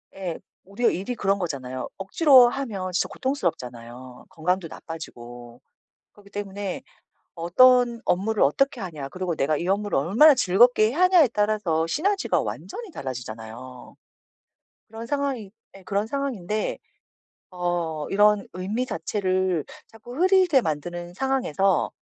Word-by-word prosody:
예. 185 -4 -5 0.3
우리의 200 +4 0
일이 195 +7 -4
그런 200 -2 0
거잖아요. 130 -7 -4
억지로 255 - +5
하면 220 -8 -4
진짜 180 - 0
고통스럽잖아요. 125 - -5
건강도 175 +1 -2
나빠지고. 120 -8 -10 0.5
그렇기 205 -1 -19
때문에 200 -1 -5 0.5
어떤 235 +7 +4
업무를 205 +4 +1
어떻게 265 - +1
하냐 155 -7 -6
그리고 180 +2 -3
내가 150 +1 +1
이 170 +4 -3
업무를 205 +1 0
얼마나 235 - +6
즐겁게 215 +3 +4
해야 290 +10 -2
하냐에 360 -7 +5
따라서 205 -7 0
시너지가 385 - 0
완전히 460 -5 -7
달라지잖아요. 125 - -8 0.9
그런 225 +1 -8
상황이 270 -6 -2 0.3
예 195 - -16
그런 200 +3 -1
상황인데 225 -7 -3 0.7
어 175 -4 -2
이런 210 0 +3
의미 200 +7 -2
자체를 185 - -1 0.2
자꾸 225 +2 -12
흐리게 370 -4 +4
만드는 175 +1 -4
상황에서 195 - 0
195 Hz, 320 characters per minute, -24 LUFS, 165-240 Hz, 0.9 s, 얼마나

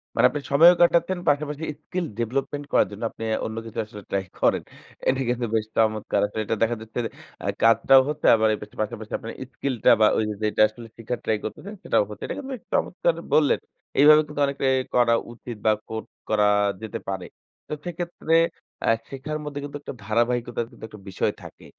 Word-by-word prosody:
মানে - - +4
আপনি 145 - -3
সময়ও 165 +5 +8
কাটাচ্ছেন। 170 +1 +4
পাশাপাশি 150 +1 0 0.2
স্কিল 180 -1 -3
ডেভেলপমেন্ট 135 +5 -2
করার - - +4
জন্য 105 +3 -8
আপনি - - -9
আ - - +2
অন্য 110 0 -5
কিছু 115 0 -6
আসলে 105 -1 -11
ট্রাই 100 -1 0 0.2
করেন। - - +2 0.4
এটা 130 0 +2
কিন্তু 120 0 0
বেশ 110 -1 +1
চমৎকার। 110 -1 +1
আসলে 105 +1 -3
এটা 115 - 0
দেখা 115 +1 +1
যাচ্ছে 110 +2 -6
যে - - -2 0.4
আ - - -2
কাজটাও 130 +4 +6
হচ্ছে 150 0 -1
আবার 110 0 +3
এর - - -2 0.2
পাশাপাশি 110 0 -5
আপনার 115 - -7 0.2
স্কিল 135 0 -2
টা - - +8
বা 110 - +7
ওইযে 105 -1 0
যেটা 105 0 +1
আসলে 115 +2 -12
শেখার 115 +1 -4
ট্রাই 110 - +1
করতেছেন 195 - -6
সেটাও - - +3
হচ্ছে। 105 - -9
এটা - - -4
কিন্তু 275 -1 -6
এক - - -24
চমৎকার 170 -2 +1 0.2
বললেন। 150 -2 +4 0.4
এইভাবে 150 +2 +8
কিন্তু 150 0 -4
অনেকটাই 140 -1 0 0.2
করা 120 -1 +5 0.2
উচিত 120 0 -8
বা 110 - +6 0.2
কর 110 0 -4 0.3
করা 105 -1 +3 0.4
যেতে 110 -2 -5
পারে। 95 -2 -3 0.4
তো - - -5
সেক্ষেত্রে 175 -1 -3 0.5
আ - - -1 0.2
শেখার 140 +3 -4
মধ্যে 145 -1 -5
কিন্তু 145 0 -6
একটা - - -7
ধারাবাহিকতার 120 +2 0
কিন্তু - - -16
একটা 105 -1 -13
বিষয় 95 - 0
থাকে। - - -12
120 Hz, 195 wpm, -24 LUFS, 110-145 Hz, 0.5 s, সময়ও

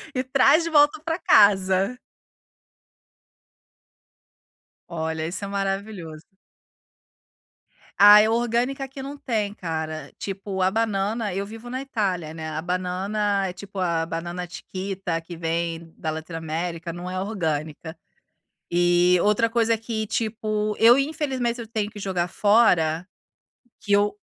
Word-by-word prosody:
e 255 - 0
traz 275 +5 +4
de 335 - -2
volta 295 -1 +4
para 325 0 -1
casa." 195 - +4 2.9
Olha, 160 -1 -3
isso 180 +4 -5
é - - -5
maravilhoso. 195 -5 -4 1.7
Ah, 205 +1 +9
é 215 - +2
orgânica 240 +4 0
que 270 +1 -9
não 280 +2 -7
tem, 215 -7 -2
cara. 160 -4 -5
Tipo, 195 -1 -4
a 185 - +4
banana 210 -1 -1
eu 195 +2 -2
vivo 225 +3 -10
na 255 +2 -3
Itália, 190 - -2
né, 160 -1 -6
a 155 0 -4
banana 190 +3 -1
é, 180 - -5
tipo, 200 +1 -9
a 170 -3 0
banana 175 +2 -5
chiquita 185 -1 -4
que 170 +1 -9
vem 165 0 -3
da 160 - -3
Latin 160 +2 -7
América, 165 +1 -4
não 175 +1 -6
é 185 0 -3
orgânica. 160 -5 -3 0.7
E 175 +1 +4
outra 210 +2 +3
coisa 230 -1 +2
que, 220 -1 -4
tipo, 215 -1 -2
eu, 235 +3 +7
infelizmente, 275 -5 -1
se 240 - -6
eu 225 - -9
tenho 215 -2 -3
que 210 - -11
jogar 185 -3 -1
fora 180 -6 +3 0.7
que 210 -2 -3
eu 205 +1 +3
195 Hz, 135 wpm, -24 LUFS, 170-225 Hz, 2.9 s, Ah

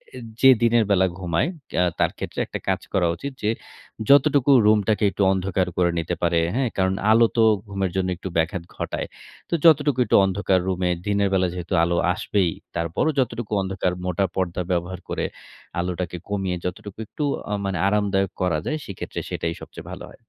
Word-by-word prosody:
অ্যা 125 - -7 0.2
যে, 135 - +8
দিনের 115 -1 +4
বেলা 95 -1 +4
ঘুমায় 85 - 0 0.3
আ - - +4 0.2
তার - - +2
ক্ষেত্রে - - -5
একটা - - -6
কাজ - - 0
করা 90 -3 +3
উচিত 140 +11 -6
যে, 105 - +2 0.6
যতটুকু 140 -1 +5
রুমটাকে 105 0 +3
একটু 100 - 0
অন্ধকার 95 -1 0
করে 90 -1 +3
নিতে 85 +1 -2
পারে 85 -1 +3 0.2
হ্যাঁ, 130 -1 +1
কারণ 95 0 +2 0.2
আলো 115 +1 +6
তো 115 - +5 0.2
ঘুমের 95 -2 -2
জন্য 95 -1 0
একটু 95 - -6
ব্যাঘাত 85 +2 0
ঘটায়। - - -3 0.4
তো - - -4
যতটুকু 145 -4 +5
একটু - - +2
অন্ধকার 95 -1 +1
রুমে 90 -1 0 0.2
দিনের 100 -1 +2
বেলা 95 -1 +3
যেহেতু 90 -1 -5
আলো 85 +1 +1 0.2
আসবেই, 90 -1 0 0.2
তারপরও 85 - 0
যতটুকু 120 -3 -2
অন্ধকার 95 -1 -1
মোটা 90 +2 +1
পর্দা 90 -1 -1
ব্যবহার 90 +1 -2
করে - - -1 0.5
আলোটাকে 90 0 -3
কমিয়ে 95 -3 -1
যতটুকু 95 +2 -5
একটু 150 - -5 0.3
আ - - 0
মানে 95 -2 -1
আরামদায়ক 100 -2 +1
করা 85 -4 +1
যায় 155 - -1
সেক্ষেত্রে 100 - -6
সেটাই 85 - -2
সবচেয়ে - - -10
ভালো - - -7
হয়। - - -15
95 Hz, 175 wpm, -23 LUFS, 90-105 Hz, 0.6 s, যে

